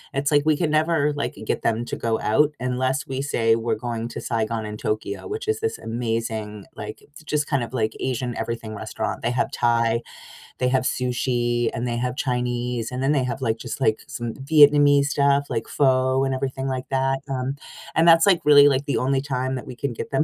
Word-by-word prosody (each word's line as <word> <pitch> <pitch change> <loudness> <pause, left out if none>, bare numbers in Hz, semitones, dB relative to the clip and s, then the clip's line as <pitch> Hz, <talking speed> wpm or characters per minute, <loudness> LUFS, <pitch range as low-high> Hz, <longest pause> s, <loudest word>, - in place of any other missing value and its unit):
it's 140 +2 0
like 145 0 +5
we 155 -1 +2
can 155 - 0
never, 155 -1 +2
like, 145 - -3
get - - -1
them 115 +1 0
to - - -4
go 115 -1 -1
out 150 +7 +2
unless 130 +2 -1
we 135 0 -3
say 115 -5 +2
we're 115 +1 -1
going 115 -1 -4
to - - -7
Saigon& 110 -2 -2
Tokyo, 105 -2 -3
which 425 +1 -5
is 435 0 0
this 450 0 -2
amazing, 115 -3 -3
like, 105 +1 -7
j - - -22 0.2
just 150 0 -1
kind 140 -4 0
of 115 - -7
like 110 -3 -1
Asian 125 -1 -2
everything 115 -1 -4
restaurant, 105 - -4
they 120 - 0
have 125 - 0
Thai, 115 -1 +1 0.6
they 125 0 +1
have 130 0 +1
sushi, 120 -1 0
and 120 +2 -3
they 120 - -2
have 125 +1 -2
Chinese, 125 -2 -2
and 125 +1 -3
then 135 - +2
they 140 -4 +2
have, 125 +1 -3
like, 115 -1 0
just - - -6
like 110 -4 +2
some 120 -1 -5
Vietnamese 145 0 +5
stuff 140 -1 +2
like 115 - -2
pho 130 -1 +2
and 135 - 0
everything 130 0 -3
like 130 -1 -3
that, 135 0 +1
um, 135 +1 -2 0.4
and 165 +1 +3
that's, 165 0 +7
like, 185 -4 +4
really, 145 -1 +8
like, 140 0 +1
the - - 0
only 135 +1 +1
time 130 -2 -2
that 130 - -5
we 125 - -7
can 135 0 -3
get - - -6
them 140 +3 +2
130 Hz, 215 wpm, -23 LUFS, 115-140 Hz, 0.6 s, really